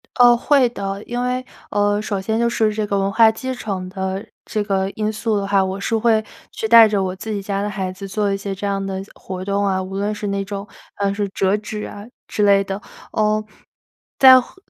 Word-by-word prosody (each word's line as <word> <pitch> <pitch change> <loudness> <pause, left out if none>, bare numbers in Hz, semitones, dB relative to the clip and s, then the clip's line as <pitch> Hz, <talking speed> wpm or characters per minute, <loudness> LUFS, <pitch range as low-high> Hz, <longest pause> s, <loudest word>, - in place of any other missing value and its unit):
哦， 245 -1 +7
会 270 +1 +3
的。 195 -3 -5
因 240 +1 -3
为， 250 +1 -1 0.2
呃， 205 0 +1
首 205 -2 -2
先 220 +4 -1
就 235 0 +2
是 220 -2 +1
这 215 0 -1
个 200 - 0
文 195 0 0
化 220 +2 +6
继 260 +4 -4
承 195 -7 -4
的 190 +1 -4 0.2
这 215 -2 -2
个 195 -2 0
因 215 +1 -2
素 215 0 -1
的 200 - -1
话， 195 -1 +3
我 190 +1 -3
是 225 +3 -1
会 220 -1 +3 0.3
去 220 - -3
带 230 0 +9
着 205 -2 0
我 185 0 -3
自 220 +3 -6
己 205 - -2
家 200 0 -2
的 205 - -2
孩 190 -2 -3
子 195 +1 -8
做 205 +1 0
一 - - -1
些 195 0 -4
这 200 - -5
样 195 -1 -1
的 190 -1 -3
活 185 0 -7
动 200 0 0
啊， 190 -1 +1
无 190 +1 -6
论 205 +2 -1
是 210 0 -5
那 200 0 -1
种， 200 0 -6 0.3
呃， 200 -1 0
是 205 0 -1
折 195 +1 +1
纸 210 0 -6
啊 205 0 -9 0.2
之 210 - -1
类 200 -1 +5
的。 195 +1 -5 0.3
呃， 215 0 +1 0.7
再 260 -1 +9
后 245 - -15
205 Hz, 250 characters per minute, -20 LUFS, 195-220 Hz, 0.7 s, 带